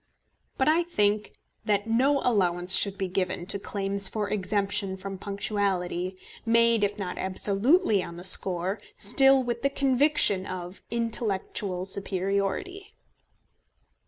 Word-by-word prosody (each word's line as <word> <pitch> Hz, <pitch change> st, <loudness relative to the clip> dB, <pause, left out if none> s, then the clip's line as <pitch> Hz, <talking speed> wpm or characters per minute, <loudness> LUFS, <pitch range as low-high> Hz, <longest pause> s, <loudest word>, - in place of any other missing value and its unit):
But 265 Hz, -, 0 dB
I 320 Hz, +3 st, +3 dB
think 210 Hz, -11 st, -1 dB, 0.3 s
that 205 Hz, -2 st, 0 dB
no 265 Hz, +5 st, +1 dB
allowance 180 Hz, -5 st, +1 dB
should 200 Hz, 0 st, +3 dB
be 195 Hz, -2 st, -3 dB
given 185 Hz, -1 st, -3 dB
to 200 Hz, -, +1 dB
claims 195 Hz, 0 st, +1 dB
for 210 Hz, -2 st, -3 dB
exemption 200 Hz, -1 st, -1 dB
from 195 Hz, 0 st, -8 dB
punctuality, 190 Hz, -3 st, -3 dB, 0.3 s
made 230 Hz, -1 st, +3 dB
if 205 Hz, 0 st, -1 dB
not 185 Hz, -3 st, -6 dB
absolutely 205 Hz, -, +1 dB
on 170 Hz, -, -8 dB
the 175 Hz, +1 st, -11 dB
score 185 Hz, +2 st, +5 dB, 0.2 s
still 270 Hz, +5 st, +4 dB
with 240 Hz, -1 st, -4 dB
the 275 Hz, -, +1 dB
conviction 275 Hz, -7 st, +2 dB
of 180 Hz, 0 st, -8 dB
intellectual 210 Hz, -5 st, -2 dB
superiority. 200 Hz, -, -3 dB
200 Hz, 125 wpm, -26 LUFS, 190-230 Hz, 0.3 s, score